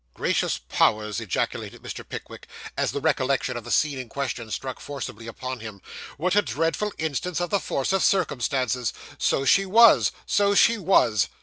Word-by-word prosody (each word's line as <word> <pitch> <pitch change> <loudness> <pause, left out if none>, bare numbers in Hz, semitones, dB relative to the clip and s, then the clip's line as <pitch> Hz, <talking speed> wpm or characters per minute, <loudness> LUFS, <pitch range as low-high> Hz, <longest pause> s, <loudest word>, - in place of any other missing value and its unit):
'Gracious - - 0
powers!' 105 +1 0
ejaculated 105 -6 -3
Mr. - - -7
Pickwick, - - -9 0.3
as - - 0
the - - -3
recollection 135 -4 0
of 120 - -5
the 120 - -9
scene 145 +1 +1
in 125 -3 -7
question 130 -4 -4
struck 130 +3 -5
forcibly 120 -5 -7
upon 130 +2 -6
him; 110 -3 -9 0.4
'what 180 +6 0
a 205 - +6
dreadful 165 +5 -1
instance 160 +3 -2
of 175 0 -2
the 200 - +2
force 135 +1 -2
of 195 - +2
circumstances! 130 - 0 0.3
So 135 - +1
she 195 +9 +5
was 225 +4 +6
so 200 0 +2
she 230 +2 +5
was. 110 - +3
140 Hz, 170 wpm, -25 LUFS, 120-180 Hz, 0.4 s, a